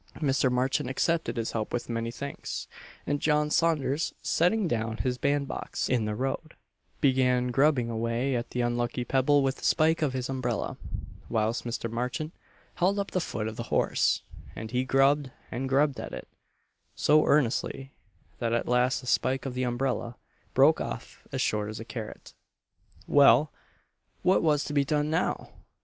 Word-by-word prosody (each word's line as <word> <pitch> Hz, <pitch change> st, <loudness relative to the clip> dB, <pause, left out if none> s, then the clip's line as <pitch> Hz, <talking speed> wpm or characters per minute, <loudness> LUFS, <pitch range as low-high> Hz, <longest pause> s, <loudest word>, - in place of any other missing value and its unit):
Mr. 135 Hz, -3 st, +2 dB
Marchant 130 Hz, +2 st, 0 dB
accepted 165 Hz, +2 st, 0 dB
his 115 Hz, -1 st, -1 dB
help 110 Hz, -2 st, -3 dB
with 120 Hz, -, -2 dB
many 115 Hz, 0 st, -2 dB
thanks; 140 Hz, +4 st, -6 dB, 0.4 s
and 145 Hz, -, 0 dB
John 150 Hz, -1 st, +2 dB
Saunders, 155 Hz, -2 st, +1 dB
setting 180 Hz, +4 st, +2 dB
down 115 Hz, -4 st, -1 dB
his 125 Hz, -1 st, -1 dB
band 140 Hz, 0 st, +1 dB
box -, -, -3 dB
in 120 Hz, -4 st, +1 dB
the 105 Hz, 0 st, -2 dB
road, 135 Hz, +6 st, -3 dB, 0.5 s
began 125 Hz, -2 st, +3 dB
grubbing 135 Hz, -2 st, +3 dB
away 115 Hz, +4 st, -1 dB
at 120 Hz, 0 st, -3 dB
the 125 Hz, -, -2 dB
unlucky 120 Hz, +1 st, -1 dB
pebble 135 Hz, +3 st, +3 dB
with 135 Hz, 0 st, 0 dB
the -, -, -14 dB
spike 160 Hz, 0 st, +3 dB
of 145 Hz, -4 st, +1 dB
his 130 Hz, -1 st, -2 dB
umbrella, 130 Hz, -4 st, -2 dB, 0.5 s
whilst 110 Hz, +2 st, 0 dB
Mr. 115 Hz, -1 st, -3 dB
Marchant 125 Hz, +8 st, -3 dB, 0.4 s
held 190 Hz, +3 st, +2 dB
up 200 Hz, -1 st, -2 dB
the 185 Hz, -, 0 dB
foot 110 Hz, -8 st, -3 dB
of 110 Hz, -, -6 dB
the -, -, -3 dB
horse; -, -, +2 dB, 0.3 s
and 110 Hz, 0 st, -6 dB
he 125 Hz, +1 st, +1 dB
grubbed 135 Hz, +1 st, +3 dB, 0.2 s
and 130 Hz, +2 st, -3 dB
grubbed 140 Hz, 0 st, +2 dB
at -, -, -6 dB
it, -, -, -8 dB, 0.7 s
so 155 Hz, +1 st, +4 dB
earnestly, 135 Hz, 0 st, +1 dB, 0.5 s
that 115 Hz, -1 st, 0 dB
at 120 Hz, -, 0 dB
last 125 Hz, +1 st, +2 dB
the -, -, -12 dB
spike 130 Hz, +2 st, +1 dB
of 135 Hz, -, -3 dB
the 125 Hz, -, -2 dB
umbrella 120 Hz, -1 st, -1 dB, 0.4 s
"broke -, -, +5 dB
off -, -, -7 dB
as -, -, -2 dB
short 105 Hz, -1 st, 0 dB
as 110 Hz, -, -6 dB
a 115 Hz, -, -7 dB
carrot." 110 Hz, -3 st, -8 dB, 0.7 s
Well, 140 Hz, 0 st, +5 dB, 0.7 s
what 185 Hz, +1 st, +4 dB
was 150 Hz, -2 st, +2 dB
to 150 Hz, -, -5 dB
be 145 Hz, -1 st, +3 dB
done 150 Hz, +2 st, 0 dB
now? 165 Hz, +3 st, -1 dB
130 Hz, 170 wpm, -28 LUFS, 120-145 Hz, 0.7 s, broke